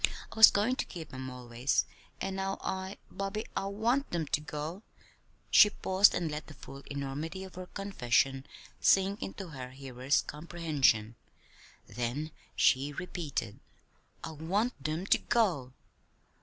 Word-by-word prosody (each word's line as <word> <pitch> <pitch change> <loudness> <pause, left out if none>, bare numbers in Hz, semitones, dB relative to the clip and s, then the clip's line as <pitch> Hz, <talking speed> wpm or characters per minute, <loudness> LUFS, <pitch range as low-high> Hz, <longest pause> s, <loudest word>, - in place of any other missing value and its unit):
I - - -10
was 220 -1 +11
goin' 215 +6 +1
to - - -1
keep 160 -5 -9
'em 130 0 -5
always; 125 +1 0 0.3
and 190 0 -3
now 195 0 -2
I 190 +1 -3
Bobby, 195 +3 -3
I - - -1
want 235 +7 0
them 170 -2 -1
to 150 - +1
go!" 150 +5 -5 0.7
she 210 - +9
paused 190 0 +4
and 165 -3 -1
let 150 +1 -5
the 155 - -11
full 135 +1 -10
enormity 140 +6 -4
of 190 - -10
her 185 0 -7
confession 135 -9 0 0.3
sink 195 +2 +3
into 195 -2 -6
her 130 -4 -7
hearer's 130 0 -1
comprehension. 150 -9 0 0.7
Then 125 +6 -3 0.2
she 135 +3 +3
repeated: 150 - -4 0.6
"I - - -5
want 175 - -1
them 155 +5 -2
to - - +4
go!" 175 - +1
160 Hz, 140 wpm, -31 LUFS, 135-195 Hz, 0.7 s, was